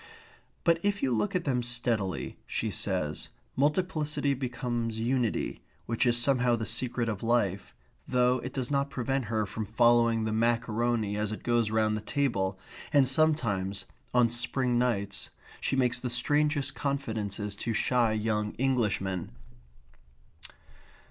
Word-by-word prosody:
But 170 -1 +4
if 205 0 0
you 130 -3 +2
look 200 - -1
at 180 - +1
them 130 -5 0
steadily, 120 -5 -1
she - - -2
says, - - -2 0.3
multiplicity 150 0 +1
becomes 120 -3 -3
unity, 120 0 -1 0.2
which 115 +2 +1
is 120 0 +4
somehow 125 -1 +3
the 110 -1 -3
secret 120 +3 0
of 105 -4 -3
life, 105 -5 0 0.3
though 125 0 +3
it 130 +2 -6
does 130 0 -3
not 140 0 +1
prevent 135 0 -1
her 110 0 0
from 105 +2 -4
following 115 +1 +3
the 110 - -1
macaroni 115 -1 +1
as 105 0 -1
it 110 - -6
goes 120 -2 +2
round 110 0 +2
the 110 - -3
table, 105 -7 0 0.3
and 140 -3 +5
sometimes, 125 -10 +1 0.3
on 120 -2 +4
spring 120 +1 +1
nights, 100 -5 -1 0.3
she - - -1
makes 125 -2 +2
the 125 - -3
strangest 145 +3 +1
confidences 110 -8 -3
to 115 - -2
shy 120 +1 +2
young 105 -1 -1
Englishmen. 105 -8 0
120 Hz, 140 wpm, -29 LUFS, 110-130 Hz, 0.3 s, and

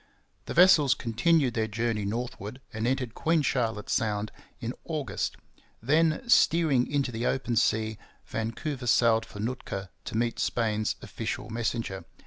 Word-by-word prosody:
The - - -5
vessels 155 -6 +6
continued 125 +4 +2
their 110 -1 0
journey 110 -1 -1
northward 115 +1 -4
and 110 +2 -1
entered 125 -3 -1
Queen 160 +2 +1
Charlotte 115 -5 -1
Sound 105 -1 0 0.3
in 120 -1 -3
August. 155 -5 -3 0.4
Then, 160 - +2
steering 160 - +4
into 140 -3 0
the 115 +1 -2
open 125 -3 -1
sea, 110 -1 +1 0.3
Vancouver 125 +4 -4
sailed 115 -1 +4
for 105 - -10
Nootka 105 -4 -4
to - - -3
meet 120 0 0
Spain's 110 -2 0
official - - -5
messenger. 110 -4 -2
120 Hz, 135 wpm, -28 LUFS, 110-135 Hz, 0.4 s, vessels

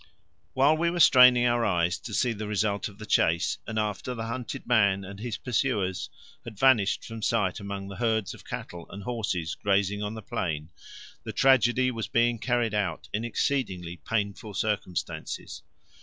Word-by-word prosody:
While 140 +4 +4
we 170 +1 +2
were 175 +1 -2
straining 125 -5 +7
our 120 -1 +2
eyes 90 -4 +1
to 115 - -8
see 120 +1 +2
the 105 -1 -5
result 105 -1 0
of 100 - -16
the 110 - -8
chase, 85 -4 +2
and 110 - -4
after 105 +4 -2
the 115 -1 -4
hunted 115 +1 -5
man 100 -5 +3
and 100 +1 -9
his 115 0 -4
pursuers 105 -6 -1 0.3
had 110 -3 -9
vanished 115 -4 +3
from 115 -1 -7
sight 105 -4 0
among 100 -1 -6
the 100 -1 -8
herds 110 -4 0
of - - -13
cattle 85 -1 -7
and 100 0 -8
horses 100 -7 -2
grazing 100 0 0
on 105 +1 -3
the 110 - -8
plain, 80 -4 -3 0.5
the - - -5
tragedy 130 -1 +4
was 115 -4 -4
being 115 +2 +2
carried 120 -2 0
out 100 -6 -2
in 110 - -1
exceedingly 95 -8 -2
painful 105 0 -3
circumstances. 100 -8 -3
110 Hz, 170 wpm, -27 LUFS, 100-120 Hz, 0.5 s, straining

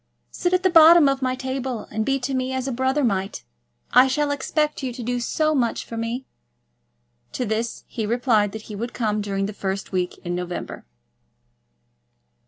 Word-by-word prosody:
Sit 355 - -1
at 365 0 +2
the 375 - +3
bottom 330 -1 +8
of 275 0 0
my 255 0 0
table, 260 -3 -3
and 220 +1 -1
be 275 +4 +1
to 260 +2 -2
me 260 0 -1
as 260 0 -2
a - - -1
brother 260 +4 0
might. 195 -4 -1 0.5
I 255 +1 +7
shall 290 +2 0
expect 300 +2 -1
you 260 -2 -3
to 245 0 -7
do 245 +1 -1
so 310 +6 0
much 245 -5 0
for 230 - -8
me." 230 +3 -3 1.1
To 250 - -2
this 225 +2 -2
he 230 - -6
had 210 - -2
replied 230 -4 +2
that 220 0 -7
he 215 - -8
would 235 +4 -5
come 215 -3 -1
during 195 -1 -2
the 210 - -4
first 195 -1 -4
week 180 -2 -1
in 175 - -2
November. 180 0 -5
245 Hz, 190 wpm, -23 LUFS, 215-270 Hz, 1.1 s, bottom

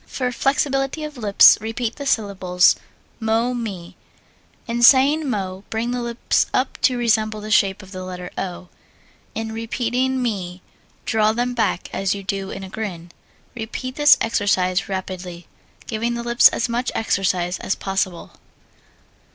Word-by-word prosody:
For 250 -2 -2
flexibility 270 +3 0
of 300 -1 -6
lips 210 -5 +6
repeat 225 +1 -3
the 280 -1 -5
syllables, 190 -6 +2 0.4
mo 225 +2 +1
me. 195 -7 -6 0.7
In 235 0 -3
saying 280 +4 +5
mo, 190 -4 -3
bring 230 +2 -2
the 245 0 -2
lips 235 0 0
up 255 0 -1
to 255 - +3
resemble 220 -2 +1
the 215 +1 -7
shape 195 -1 +2
of 190 - -14
the 185 -1 -6
letter 180 -1 -7
O. 180 -1 -5 0.7
In 225 0 -3
repeating 245 +3 -1
me 190 -7 -3 0.4
draw 215 -1 +2
them 245 +2 -1
back 225 -6 -1
as 195 0 0
you 200 - -7
do 195 0 -3
in 195 - -7
a - - -7
grin. 180 -5 -6 0.4
Repeat 240 +2 -5
this 295 -1 +6
exercise 190 -5 +1
rapidly, 185 -2 -6 0.4
giving 230 +1 -2
the 235 - -4
lips 235 0 +6
as 235 - -1
much 240 +1 -2
exercise 185 -4 0
as - - -1
possible. 190 -3 -3
220 Hz, 150 wpm, -21 LUFS, 190-240 Hz, 0.7 s, lips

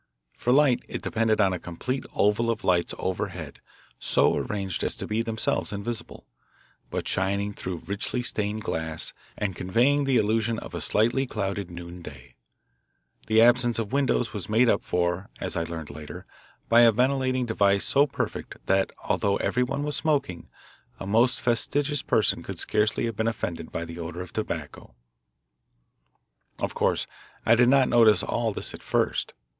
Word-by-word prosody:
For 125 - 0
light 135 -2 +4
it - - -6
depended 115 -1 +1
on 95 -3 +3
a 90 - -3
complete 125 +12 -4
oval 105 +3 +2
of 115 -1 -2
lights 90 -2 +1
overhead 90 -5 -4 0.4
so - - +3
arranged 100 -3 -3
as - - 0
to - - -6
be 110 +1 -1
themselves 115 -1 -1
invisible, 110 +3 -5 0.6
but - - -3
shining 100 +2 0
through 90 -3 -6
richly 105 +5 -2
stained 105 -2 -2
glass 80 -3 -3 0.2
and 100 -3 -2
conveying 125 +11 +2
the 135 -2 +3
illusion 110 +1 +1
of - - -8
a - - -4
slightly 120 +5 +2
clouded 100 -4 -3
noonday. 85 0 -10 0.9
The 110 +1 +5
absence 120 0 +4
of 115 -1 -3
windows 135 -3 +1
was 105 -4 -5
made 115 +3 +4
up - - +2
for, 90 +2 -1
as - - -2
I 85 - -1
learned 80 -3 -6
later, 75 +1 -9 0.4
by 115 +1 +6
a 115 -1 +7
ventilating 130 +2 +1
device 100 -3 +2
so 140 +1 +4
perfect 135 - -4
that, 95 0 +2
although 100 -1 +1
everyone 125 +3 0
was 150 0 -1
smoking, 140 - -1 0.5
a - - -6
most 115 +5 +3
fastidious 145 +4 +1
person 110 -6 +1
could - - -7
scarcely 105 +2 +1
have 115 -2 -3
been 110 +2 0
offended 85 -7 -3
by 85 - -3
the 85 +1 -9
odour 85 +2 -5
of 90 - -13
tobacco. - - -5 1.6
Of - - -3
course - - +1 0.4
I 115 - +6
did 120 +1 +5
not 135 -1 +5
notice 110 -5 +5
all - - -1
this - - -4
at - - -10
first. - - -1
110 Hz, 160 wpm, -26 LUFS, 95-120 Hz, 1.6 s, a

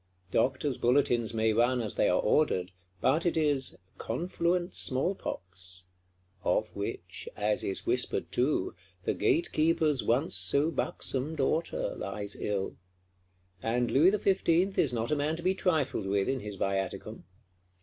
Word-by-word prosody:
Doctors' 130 +3 +1
bulletins 120 -2 +2
may 110 -1 +1
run 120 +3 +2
as 110 -4 -3
they - - +2
are 90 - +2
ordered, 95 -8 +1 0.3
but 155 +6 +3
it 170 -2 0
is 145 -4 +1 0.2
"confluent 175 +6 -1
small 135 +9 +1
pox,"—of 90 - -6
which, - - -5
as - - 0
is 380 -1 -3
whispered 360 +2 0
too, - - 0 0.3
the - - 0
Gatekeeper's 165 - +1
once 125 +7 +1
so 140 - +4
buxom 140 -1 -1
Daughter 155 +3 -1
lies 100 +1 -4
ill: 100 -2 -3 0.8
and 120 +2 0
Louis 155 +7 +6
XV. 190 -2 +2
is 145 - +3
not 115 -1 -2
a - - +3
man 150 +2 0
to 170 - -8
be 185 +1 +3
trifled 155 - 0
with 100 0 +1
in 135 - 0
his 105 -3 -7
viaticum. 95 0 -3
130 Hz, 140 wpm, -30 LUFS, 105-165 Hz, 0.8 s, Louis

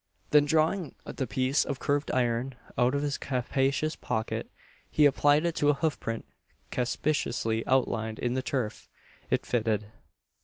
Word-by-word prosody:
Then 150 -1 +6
drawing 160 +1 +1
the 130 - -3
piece 130 +4 +2
of 140 - -3
curved 145 +2 0
iron 125 +1 0 0.2
out 125 +3 +3
of 140 - 0
his 145 -1 -1
capacious 135 +4 0
pocket, 110 0 -3 0.4
he 150 - +4
applied 145 +2 +4
it 170 - +1
to 145 - +3
a 145 - +4
hoof 155 +1 -1
print 115 0 -4 0.5
conspicuously 120 -3 0
outlined 110 -4 +1
in 120 0 -1
the 130 - 0
turf. 125 -5 -3 0.4
It - - +1
fitted. 110 -3 0
135 Hz, 150 wpm, -29 LUFS, 120-145 Hz, 0.5 s, Then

